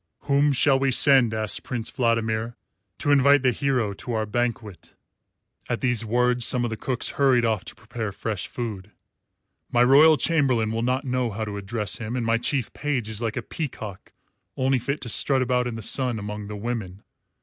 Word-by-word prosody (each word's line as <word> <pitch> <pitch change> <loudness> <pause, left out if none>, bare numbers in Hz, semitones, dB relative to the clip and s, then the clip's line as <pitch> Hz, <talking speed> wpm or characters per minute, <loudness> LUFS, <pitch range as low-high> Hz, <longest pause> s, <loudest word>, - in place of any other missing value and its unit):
"Whom 145 +1 +2
shall 135 0 +3
we 135 0 +1
send," 130 -2 +5
asked 110 -2 -1
Prince 120 -3 -4
Vladimir, 115 -1 -1 0.4
"to 145 - 0
invite 140 0 +5
the 130 - +4
hero 125 -4 -1
to 120 +4 -6
our 110 -1 -1
banquet?" 115 -3 -4 0.7
(At 120 - -2
these 120 -3 +1
words 125 +2 +1
some 125 +1 +3
of 120 - -2
the - - -2
cooks 125 +2 -2
hurried 130 -4 +4
off 110 -4 0
to - - -10
prepare 110 0 -6
fresh 100 -2 -4
food.) 105 -5 -6 0.8
"My 120 0 +4
royal 150 +5 +6
chamberlain 130 -10 +1
will 115 0 -2
not 130 +4 -1
know 125 -2 -1
how 110 +1 -4
to 105 -1 -6
address 100 +1 -4
him, 115 +1 -5
and 120 -2 -2
my 115 0 +1
chief 125 -1 -2
page 135 -7 -2
is 110 0 -5
like 115 -1 -3
a 125 - -3
peacock 110 - -7 0.5
only 130 0 +1
fit 140 +5 -3
to 125 - -6
strut 135 +4 +3
about 125 0 0
in 120 - -4
the 110 - -7
sun 125 +1 0
among 105 0 -6
the 105 - -6
women. 105 -3 -5
120 Hz, 195 wpm, -24 LUFS, 110-130 Hz, 0.8 s, royal